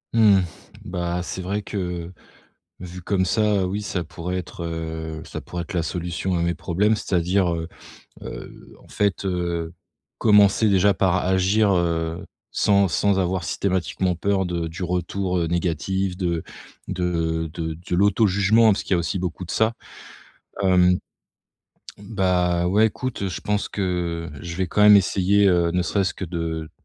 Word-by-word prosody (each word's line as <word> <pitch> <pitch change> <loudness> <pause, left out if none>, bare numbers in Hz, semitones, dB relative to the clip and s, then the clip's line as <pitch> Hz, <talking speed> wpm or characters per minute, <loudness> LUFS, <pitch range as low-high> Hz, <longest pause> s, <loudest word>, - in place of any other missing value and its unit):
Mmh. 105 -4 +6 0.4
Bah, 90 -1 -2
c'est 95 - -5
vrai 100 +3 -3
que 90 -4 -4 0.7
vu, 90 0 -8
comme 95 +1 0
ça, 105 -1 +2
oui, 100 +3 -3
ça 90 -4 -3
pourrait 90 +3 -5
être, 90 -1 -6
heu, 80 -1 -5
ça - - -7
pourrait 90 -1 -5
être 95 - -9
la 85 -2 0
solution 90 +2 -2
à - - 0
mes 85 0 +1
problèmes. 105 +5 +1
C'est-à-dire, 90 -2 +1
heu, 80 -1 -3 0.6
heu, - - -10
en - - -20
fait, 100 -2 -1
heu, 85 -3 -2 0.5
commencer 105 0 +5
déjà 100 0 +4
par 95 -1 +1
agir, 95 +3 +2
heu, 85 -2 0 0.3
sans 100 -1 +3
sans 100 +3 +1
avoir 90 -1 0
systématiquement 90 0 -1
peur 95 +2 0
de 85 -2 -2
du 80 +3 -8
retour, 90 +1 -1
heu, 85 - 0
négatif 90 +2 -1
de 85 -4 -1 0.5
de 85 -3 -1
de 80 -1 -3
de 90 - 0
l'auto-jugement, 105 +2 +4
parce 100 - -2
qu'il - - -5
y - - +3
a - - 0
aussi 85 +3 -2
beaucoup 90 0 -4
de - - -8
ça. 110 +1 +2 0.9
Hem, 90 -1 +4 1.0
bah, 90 -4 0
ouais, 105 +4 +4
écoute, 125 +3 -4
heu, 100 - 0
je 90 - -5
pense 105 0 -1
que 85 -4 -2
je 85 -1 -6
vais 95 0 0
quand 100 - -1
même 105 0 +9
essayer, 100 +1 +3
heu, 85 -2 +3
ne 90 0 +1
serait-ce 95 +1 0
que - - -5
de, 80 -2 -4
90 Hz, 165 wpm, -23 LUFS, 85-100 Hz, 1.0 s, même